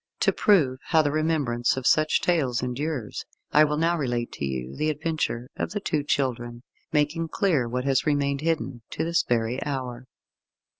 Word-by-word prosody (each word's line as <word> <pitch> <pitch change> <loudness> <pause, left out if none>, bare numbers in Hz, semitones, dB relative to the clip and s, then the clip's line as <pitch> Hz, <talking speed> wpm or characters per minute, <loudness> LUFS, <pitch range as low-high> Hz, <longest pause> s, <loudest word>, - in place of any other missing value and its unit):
To - - +3
prove 145 -11 +3
how 160 -2 +4
the 145 - 0
remembrance 145 -7 +1
of 130 - -4
such 155 +2 +3
tales 135 -9 +1
endures, 125 -1 -3 0.3
I 150 - +6
will 150 0 +1
now 165 +2 +2
relate 120 -6 -2
to - - -4
you 65 -1 -4
the 155 - 0
adventure 155 -5 -2
of - - -3
the 205 - -1
Two 155 -6 -1
Children, 120 -4 -2 0.3
making 150 +2 +1
clear 155 - +1
what 125 +1 -2
has 135 +2 +1
remained 140 -1 +1
hidden 160 -6 -1
to - - -3
this 170 +1 +2
very 120 +2 -1
hour. 130 -3 -4
140 Hz, 170 wpm, -26 LUFS, 120-155 Hz, 0.3 s, I